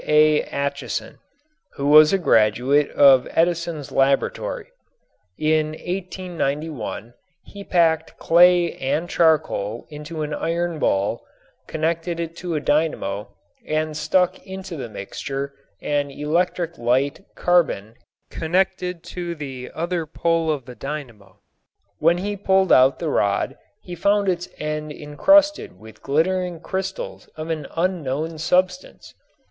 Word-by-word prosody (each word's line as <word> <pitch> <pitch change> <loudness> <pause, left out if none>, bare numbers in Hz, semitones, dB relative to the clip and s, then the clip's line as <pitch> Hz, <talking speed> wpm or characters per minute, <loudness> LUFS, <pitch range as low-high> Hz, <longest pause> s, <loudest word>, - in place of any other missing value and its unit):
A. 150 0 +5
Acheson, 140 0 -4 0.5
who 140 - -4
was 150 +1 +8
a 195 - +3
graduate 130 - +3
of 135 -3 +6
Edison's 170 -3 0
laboratory. 135 0 0 0.7
In 155 0 +1
1891 165 - -4 0.3
he 200 -1 -11
packed 165 -4 +1
clay 175 0 +5
and 150 +6 -1
charcoal 150 - +1
into 150 +1 -6
an 150 0 -4
iron 170 +1 -2
bowl, 100 -6 0 0.4
connected 165 +2 -2
it 165 0 -4
to 175 -2 -4
a - - +1
dynamo 145 -10 -1 0.3
and 155 0 -2
stuck 165 +4 +1
into 190 -2 -7
the 130 -6 -6
mixture 135 +7 -5 0.3
an 145 -1 0
electric 165 +4 -1
light 130 +8 +1
carbon 155 - +1 0.4
connected 180 +1 -1
to 170 0 -5
the 135 -4 -7
other 170 0 -2
pole 165 +1 0
of 145 -5 -1
the 125 - -9
dynamo. 115 -7 -8 0.6
When 170 +2 +4
he 205 +3 -3
pulled 190 -1 +2
out 130 +1 +6
the 165 - -3
rod 100 -7 0 0.3
he 175 - -9
found 200 +2 +2
its 175 -1 -2
end 155 0 -4
encrusted 290 - +2
with 110 0 -14
glittering 175 +4 0
crystals 195 - -5
of 155 +1 -5
an 155 -3 -3
unknown 160 -3 -2
substance. 180 +3 -1
155 Hz, 120 wpm, -22 LUFS, 140-175 Hz, 0.7 s, was